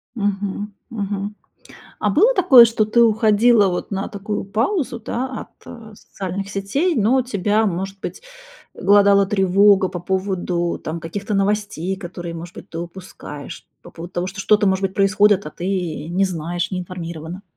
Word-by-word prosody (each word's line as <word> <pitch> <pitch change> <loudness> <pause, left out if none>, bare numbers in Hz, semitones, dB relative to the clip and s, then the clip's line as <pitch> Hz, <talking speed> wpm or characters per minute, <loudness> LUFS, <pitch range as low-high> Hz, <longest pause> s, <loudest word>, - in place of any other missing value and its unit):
Мгм, 205 -1 -3 0.2
мгм. 205 -2 -4 0.6
А 210 - +1
было 420 - +4
такое, 290 - +8
что 225 -2 +1
ты 235 +2 +3
уходила 220 0 +4
вот 180 +2 -3
на 195 0 -2
такую 205 +1 -4
паузу, 235 - -1
да, 240 +3 -3 0.2
от, - - -12 0.2
э, 225 -3 -11
социальных 195 0 -6
сетей, 240 - -1
но 240 +3 +3
тебя, 215 -2 0
может 195 +1 -3
быть, - - -6 0.5
глодала 200 0 +4
тревога 195 0 +4
по 180 - -5
поводу 180 -1 -2
там 160 +2 -4
каких-то 200 +6 -4
новостей, 195 -2 -1
которые, 175 -2 -7
может 170 +1 -8
быть, - - -11
ты 165 - -6
упускаешь, 170 -4 -9 0.2
по - - -13
поводу 170 +2 -10
того, 175 0 -2
что 195 +1 -6
что-то, 210 +1 +3
может 190 0 +1
быть, 190 -1 -1
происходит, 205 -1 +3
а - - -5
ты 175 - -6
и 175 -5 -3
не 185 +3 +1
знаешь, 175 -1 -3
не 185 -2 -3
информирована? 170 0 -7
195 Hz, 165 wpm, -20 LUFS, 180-210 Hz, 0.6 s, такое